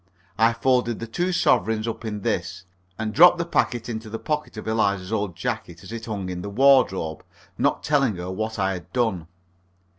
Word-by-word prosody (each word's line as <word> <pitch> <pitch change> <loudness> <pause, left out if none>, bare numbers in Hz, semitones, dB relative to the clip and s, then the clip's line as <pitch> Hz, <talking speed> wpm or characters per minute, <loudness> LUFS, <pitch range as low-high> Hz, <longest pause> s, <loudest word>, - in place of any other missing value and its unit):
I 115 +1 +5
folded 120 -1 +1
the 115 - -4
two 175 +11 -1
sovereigns 110 - +2
up 115 - -4
in 105 -2 -4
this, 90 0 -2 0.3
and 110 -1 -3
dropped 175 +5 +7
the 170 - -1
packet 120 -8 0
into 110 -2 -5
the 115 - -4
pocket 150 -2 -3
of 110 - -7
Eliza's 100 -3 0
old 100 -5 -1
jacket, 85 0 -4
as 95 - -10
it 115 -1 -6
hung 100 -4 -4
in 90 -1 -4
the 100 - -5
wardrobe, 100 - +3 0.3
not - - 0
telling 140 -7 +2
her 90 +1 -5
what 110 +3 -3
I 95 -1 +1
had 90 -1 -9
done. 110 -10 0
110 Hz, 190 wpm, -24 LUFS, 95-120 Hz, 0.3 s, dropped